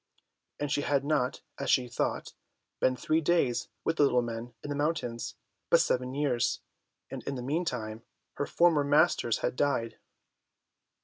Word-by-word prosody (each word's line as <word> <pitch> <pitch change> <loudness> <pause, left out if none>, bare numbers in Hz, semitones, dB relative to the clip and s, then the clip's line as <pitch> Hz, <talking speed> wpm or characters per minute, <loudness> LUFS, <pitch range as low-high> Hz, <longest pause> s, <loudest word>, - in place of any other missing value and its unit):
And 145 -1 -2
she 145 - +1
had 140 -1 +1
not, 145 -4 0 0.2
as 140 - -2
she 125 -2 +3
thought, 120 - -2 0.5
been 130 - +3
three 155 +5 +1
days 140 -7 +1 0.2
with 165 - 0
the - - +5
little 125 -3 +3
men 115 +1 -6
in 145 - -5
the - - -1
mountains, 145 -6 -2 0.3
but - - +6
seven 125 +1 0
years, 140 -5 +1 0.5
and - - -5
in 140 - -3
the 125 - -5
meantime 125 -7 -2 0.4
her 145 - -1
former 170 -4 +4
masters 145 -5 +3
had - - -1
died. 130 -5 0
140 Hz, 160 wpm, -30 LUFS, 125-145 Hz, 0.5 s, but